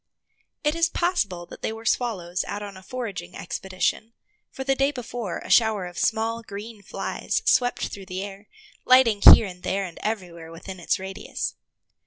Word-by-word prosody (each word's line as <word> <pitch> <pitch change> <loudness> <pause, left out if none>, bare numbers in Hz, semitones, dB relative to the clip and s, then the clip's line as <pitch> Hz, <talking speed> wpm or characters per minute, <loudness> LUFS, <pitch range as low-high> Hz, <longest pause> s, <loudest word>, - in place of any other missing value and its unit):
It 300 0 +2
is 335 0 +2
possible 220 - 0
that - - -12
they - - -1
were 225 +1 -9
swallows 190 -8 0
out 205 0 -4
on 200 -1 -8
a 190 - -11
foraging 195 -5 -6
expedition, 190 +5 -2 0.4
for 265 - -6
the 270 0 +2
day 275 +1 +2
before 240 -7 -5
a - - -7
shower 220 -5 +4
of 175 -1 -7
small, 225 +1 +1
green 215 0 -8
flies 435 - -3
swept 250 - +2
through 195 -2 -9
the 185 0 -4
air, 200 +1 -9 0.4
lighting 255 -5 +5
here 220 - +10
and 180 -2 -8
there 195 +2 -1
and 170 -3 -9
everywhere 175 -6 -4
within 185 +3 -9
its 170 - +1
radius. 190 +1 -4
205 Hz, 175 wpm, -25 LUFS, 185-240 Hz, 0.4 s, here